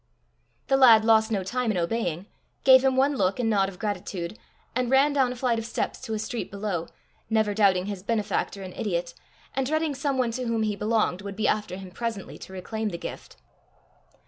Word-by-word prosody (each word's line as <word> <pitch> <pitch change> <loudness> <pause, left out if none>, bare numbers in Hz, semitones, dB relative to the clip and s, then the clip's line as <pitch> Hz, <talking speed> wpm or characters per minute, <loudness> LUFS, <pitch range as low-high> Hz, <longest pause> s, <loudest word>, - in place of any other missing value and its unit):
The 270 - +3
lad 230 -5 +7
lost 220 -1 +5
no 200 -3 0
time 245 +5 -1
in 210 - 0
obeying, 175 -1 -1 0.4
gave 260 -1 +7
him 265 -1 +3
one 275 +2 +3
look 190 +2 +1
and 225 -2 +1
nod 195 -2 +2
of 185 - -12
gratitude, 185 -2 -4 0.4
and 250 -1 0
ran 275 +3 +4
down 265 -3 +2
a - - -5
flight 240 -2 0
of 225 - -5
steps - - -3
to 225 -4 -4
a - - -1
street 220 +2 -4
below, 200 -4 -3 0.4
never 220 -2 +2
doubting 195 -3 +3
his 200 -2 -5
benefactor 205 -2 -1
an 185 -1 -8
idiot, 170 -4 -2 0.4
and 265 -1 0
dreading 310 0 0
some 275 0 -1
one 250 -2 +1
to 250 +2 -4
whom 230 -1 0
he 210 -1 0
belonged 210 -3 0
would 200 -1 -6
be 220 - 0
after 210 -4 0
him 190 -1 -9
presently 225 -1 -5
to - - -10
reclaim 215 +4 -3
the 170 - -5
gift. - - -8
220 Hz, 205 wpm, -26 LUFS, 195-250 Hz, 0.4 s, lad